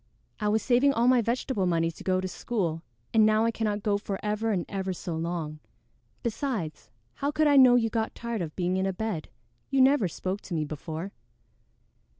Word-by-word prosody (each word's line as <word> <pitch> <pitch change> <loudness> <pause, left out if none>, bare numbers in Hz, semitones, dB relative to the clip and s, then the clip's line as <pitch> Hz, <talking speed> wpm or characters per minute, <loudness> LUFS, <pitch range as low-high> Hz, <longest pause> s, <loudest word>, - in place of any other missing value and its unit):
I 210 - 0
was 215 +1 +2
saving 265 +3 +4
all 235 0 +2
my 250 -1 +5
vegetable 230 -3 -1
money 165 -1 +1
to - - -12
go 185 -1 +1
to 185 - -2
school, 180 -5 -2 0.3
and 220 - +6
now 215 +1 +4
I 230 - +2
cannot 210 -2 -2
go 205 -2 +1
for 200 -1 -4
ever 210 +2 0
and 180 -5 -1
ever 190 -2 -3
so 175 -1 -5
long. 160 -2 -3 0.6
Besides, 225 - -3 0.2
how 280 - -2
could 310 +1 +1
I 290 -1 +5
know 255 -2 +8
you 225 -2 +2
got 225 -1 -1
tired 235 -3 -3
of 160 -3 -5
being 180 0 0
in 190 0 +1
a 190 - -1
bed? 195 -5 -3 0.4
You 275 - +1
never 260 -5 +5
spoke 185 +4 -4
to 175 - -5
me 155 -1 0
before." 160 +5 -6
205 Hz, 200 wpm, -28 LUFS, 175-235 Hz, 0.6 s, know